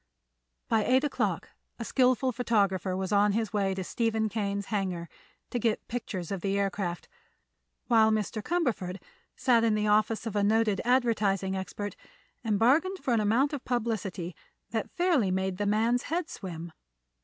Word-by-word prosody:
By 220 Hz, -1 st, +2 dB
eight 260 Hz, +4 st, +3 dB
o'clock 295 Hz, -, -1 dB, 0.3 s
a 230 Hz, -, -5 dB
skillful 255 Hz, 0 st, +2 dB
photographer 200 Hz, -6 st, +1 dB
was 190 Hz, +1 st, -3 dB
on 205 Hz, 0 st, +4 dB
his 220 Hz, 0 st, -1 dB
way 195 Hz, -2 st, +1 dB
to 190 Hz, -, -3 dB
Stephen 220 Hz, +2 st, 0 dB
Kane's 200 Hz, -1 st, -2 dB
hangar 185 Hz, -4 st, -1 dB, 0.4 s
to 245 Hz, -, -1 dB
get 225 Hz, -1 st, -1 dB
pictures 200 Hz, -7 st, -4 dB
of 195 Hz, -3 st, -3 dB
the 195 Hz, +1 st, 0 dB
aircraft, 195 Hz, -3 st, -2 dB, 0.8 s
while 225 Hz, -3 st, +5 dB
Mr. 215 Hz, 0 st, -1 dB
Cumberford 220 Hz, -, -1 dB, 0.4 s
sat 235 Hz, -3 st, +3 dB
in 225 Hz, -2 st, +3 dB
the 210 Hz, 0 st, 0 dB
office 215 Hz, +2 st, +2 dB
of 220 Hz, -2 st, -4 dB
a 205 Hz, -, +2 dB
noted 215 Hz, 0 st, +2 dB
advertising 215 Hz, -6 st, +1 dB
expert 190 Hz, +2 st, -5 dB, 0.5 s
and 215 Hz, -3 st, +1 dB
bargained 310 Hz, -, +3 dB
for 260 Hz, -9 st, -1 dB
an 230 Hz, -, +3 dB
amount 235 Hz, +8 st, +2 dB
of 280 Hz, -, -4 dB
publicity 215 Hz, -8 st, -2 dB, 0.4 s
that 225 Hz, -2 st, -2 dB
fairly 340 Hz, -, +2 dB
made 190 Hz, 0 st, -1 dB
the 205 Hz, -, -1 dB
man's 225 Hz, +4 st, +2 dB
head 335 Hz, +1 st, -2 dB
swim. 170 Hz, -3 st, -7 dB
215 Hz, 160 wpm, -29 LUFS, 195-235 Hz, 0.8 s, while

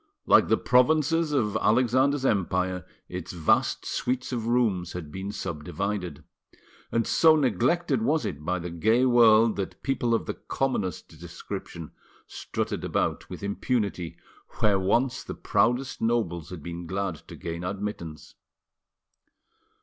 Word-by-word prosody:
Like -, -, +5 dB
the -, -, +3 dB
provinces 155 Hz, +5 st, +3 dB
of 110 Hz, -8 st, 0 dB
Alexander's 130 Hz, +5 st, +2 dB
empire, 95 Hz, -4 st, 0 dB, 0.2 s
its 90 Hz, -1 st, -6 dB
vast 85 Hz, -3 st, +1 dB
suites 130 Hz, +1 st, -2 dB
of 115 Hz, -3 st, -3 dB
rooms 110 Hz, -8 st, +1 dB
had 80 Hz, -4 st, -7 dB
been 95 Hz, +3 st, -5 dB
subdivided; 85 Hz, -1 st, -4 dB, 0.7 s
and 115 Hz, -1 st, +1 dB
so 160 Hz, -1 st, +5 dB
neglected 135 Hz, -, +1 dB
was 150 Hz, +2 st, +1 dB
it 75 Hz, -7 st, -5 dB
by 90 Hz, +3 st, 0 dB
the 85 Hz, -1 st, -5 dB
gay 110 Hz, +9 st, +2 dB
world 115 Hz, -2 st, +5 dB
that 100 Hz, -, -5 dB
people 120 Hz, -4 st, +1 dB
of -, -, -2 dB
the -, -, -3 dB
commonest 105 Hz, -10 st, -3 dB
description 85 Hz, -1 st, -8 dB, 0.3 s
strutted -, -, -4 dB
about -, -, -1 dB
with -, -, -8 dB
impunity 100 Hz, -, -2 dB, 0.4 s
where 100 Hz, -2 st, +3 dB
once 120 Hz, +7 st, +1 dB
the -, -, -7 dB
proudest 125 Hz, +3 st, 0 dB
nobles 105 Hz, -9 st, 0 dB
had 90 Hz, -5 st, -8 dB
been 85 Hz, 0 st, -6 dB
glad 95 Hz, -2 st, -2 dB
to -, -, -9 dB
gain 85 Hz, 0 st, -5 dB
admittance. 90 Hz, -5 st, -5 dB
105 Hz, 135 wpm, -26 LUFS, 90-125 Hz, 0.7 s, Like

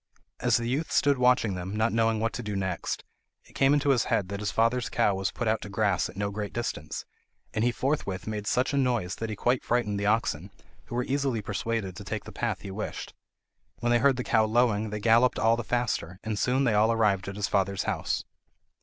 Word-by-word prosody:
As -, -, +3 dB
the 115 Hz, -, -3 dB
youth 140 Hz, +6 st, -1 dB
stood 140 Hz, -2 st, +3 dB
watching 125 Hz, -5 st, +3 dB
them, 90 Hz, +2 st, -5 dB
not 110 Hz, +1 st, +1 dB
knowing 115 Hz, -1 st, +2 dB
what 115 Hz, 0 st, -1 dB
to 120 Hz, -, -4 dB
do 105 Hz, -3 st, -4 dB
next, 95 Hz, -3 st, -2 dB, 0.4 s
it -, -, -21 dB
came 135 Hz, 0 st, +3 dB
into 145 Hz, -1 st, +3 dB
his 125 Hz, -5 st, +2 dB
head 95 Hz, -3 st, 0 dB
that 100 Hz, 0 st, -4 dB
his 105 Hz, 0 st, -2 dB
father's 115 Hz, +3 st, +1 dB
cow 100 Hz, -, +2 dB
was 95 Hz, -1 st, -1 dB
put 120 Hz, -, -4 dB
out 110 Hz, 0 st, +1 dB
to 100 Hz, -, -7 dB
grass 100 Hz, -3 st, +1 dB
at -, -, -12 dB
no 100 Hz, 0 st, -1 dB
great 105 Hz, 0 st, -4 dB
distance; 120 Hz, 0 st, -4 dB, 0.5 s
and 110 Hz, -, 0 dB
he 120 Hz, -, +3 dB
forthwith 120 Hz, -, -2 dB
made 105 Hz, -1 st, -4 dB
such 125 Hz, +5 st, +1 dB
a -, -, +1 dB
noise 120 Hz, -9 st, +1 dB
that 115 Hz, -, -4 dB
he 105 Hz, -, -3 dB
quite 125 Hz, +4 st, +1 dB
frightened 115 Hz, -4 st, 0 dB
the 100 Hz, -, 0 dB
oxen, 110 Hz, +2 st, 0 dB, 0.4 s
who -, -, -7 dB
were 125 Hz, -, +1 dB
easily 135 Hz, -3 st, 0 dB
persuaded 100 Hz, -1 st, -3 dB
to 105 Hz, -, -8 dB
take 105 Hz, +1 st, -4 dB
the 110 Hz, -, -10 dB
path 110 Hz, -2 st, -2 dB
he 100 Hz, -, -7 dB
wished. 105 Hz, +3 st, -5 dB, 0.6 s
When 120 Hz, 0 st, 0 dB
they 120 Hz, -, +4 dB
heard 140 Hz, +1 st, +4 dB
the 125 Hz, -, -3 dB
cow 110 Hz, -2 st, +3 dB
lowing 110 Hz, -1 st, +2 dB
they 105 Hz, 0 st, -4 dB
galloped 115 Hz, +3 st, +4 dB
all 115 Hz, +1 st, +4 dB
the 120 Hz, -, -4 dB
faster, 110 Hz, -7 st, -2 dB
and 110 Hz, -2 st, -2 dB
soon 130 Hz, +2 st, +2 dB
they 120 Hz, -5 st, +2 dB
all 110 Hz, +2 st, +4 dB
arrived 105 Hz, -5 st, +2 dB
at 100 Hz, -, -5 dB
his 105 Hz, -1 st, -1 dB
father's 100 Hz, 0 st, 0 dB
house. -, -, -1 dB
110 Hz, 235 wpm, -28 LUFS, 100-120 Hz, 0.6 s, they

